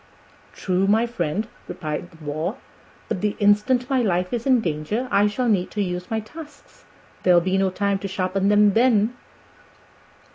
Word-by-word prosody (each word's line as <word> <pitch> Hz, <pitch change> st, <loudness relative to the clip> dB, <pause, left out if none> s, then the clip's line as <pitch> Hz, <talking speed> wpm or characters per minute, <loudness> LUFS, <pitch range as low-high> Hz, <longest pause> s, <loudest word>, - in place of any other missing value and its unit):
"True, 185 Hz, 0 st, 0 dB
my 220 Hz, +3 st, +3 dB
friend," 210 Hz, -2 st, -2 dB, 0.2 s
replied 160 Hz, -1 st, -5 dB
the 165 Hz, -, -18 dB
Boar, 155 Hz, -, -4 dB, 0.5 s
"but 180 Hz, -, -3 dB
the 210 Hz, -1 st, -1 dB
instant 210 Hz, +5 st, +2 dB
my 265 Hz, -2 st, +1 dB
life 180 Hz, -3 st, 0 dB
is 240 Hz, +1 st, -2 dB
in 255 Hz, -2 st, +5 dB
danger 180 Hz, +7 st, -2 dB
I 205 Hz, +1 st, +4 dB
shall 245 Hz, +4 st, -1 dB
need 195 Hz, -5 st, +1 dB
to 205 Hz, -, +2 dB
use 180 Hz, -1 st, -4 dB
my 225 Hz, -, -1 dB
tusks. 305 Hz, -, -13 dB, 0.4 s
There'll 180 Hz, -1 st, +5 dB
be 185 Hz, +2 st, 0 dB
no 195 Hz, 0 st, +2 dB
time 200 Hz, +1 st, -1 dB
to 195 Hz, -, -4 dB
sharpen 190 Hz, +1 st, -1 dB
them 205 Hz, -1 st, +5 dB
then." 230 Hz, 0 st, +3 dB
200 Hz, 170 wpm, -23 LUFS, 180-225 Hz, 0.5 s, in